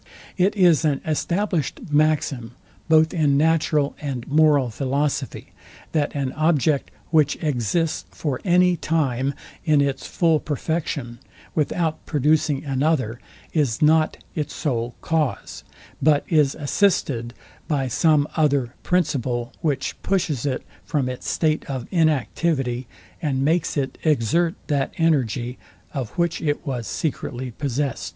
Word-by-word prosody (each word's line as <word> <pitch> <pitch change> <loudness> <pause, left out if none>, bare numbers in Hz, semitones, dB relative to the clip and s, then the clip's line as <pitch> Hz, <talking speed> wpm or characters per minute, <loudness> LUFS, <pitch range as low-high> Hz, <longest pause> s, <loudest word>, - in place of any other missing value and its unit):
It 190 +3 +2
is 175 -8 +5
an 145 -3 +1
established 170 0 -1
maxim 145 -5 +1 0.4
both 160 0 +5
in 150 -5 +3
natural 155 -2 +2
and 135 -5 -4
moral 145 -4 +4
philosophy, 140 +4 -2 0.4
that 150 -2 0
an 135 -2 -2
object, 155 -2 +1 0.2
which 155 -3 +3
exists 150 - 0
for 140 -5 -3
any 180 -1 +4
time 140 -4 0 0.3
in 150 -2 +3
its 140 -2 0
full 165 -3 +2
perfection 145 -5 -3 0.3
without 160 +1 -1
producing 150 0 +1
another, 135 -4 0 0.3
is 145 -8 +1
not 155 +1 +3 0.2
its 150 -2 -3
sole 120 -5 -2
cause; 160 -4 -2 0.4
but 145 0 +3
is 150 -5 +3
assisted 140 - 0 0.3
by 140 -4 0
some 150 +3 +3
other 140 -6 +2
principle, 130 -8 0
which 145 -5 -1
pushes 155 -9 0
it 130 - -2 0.2
from 135 -4 -1
its 125 - -5
state 155 -1 +1
of 130 -3 -4
inactivity, 145 -5 +1 0.3
and 135 -4 0
makes 160 0 +1
it 135 -2 -2
exert 160 - +2
that 140 -3 -1
energy, 130 -6 +1 0.3
of 130 -6 -3
which 170 -1 0
it 150 -2 -1
was 125 -5 -3
secretly 130 -4 -3
possest. 135 -6 -2
145 Hz, 125 wpm, -23 LUFS, 130-160 Hz, 0.4 s, is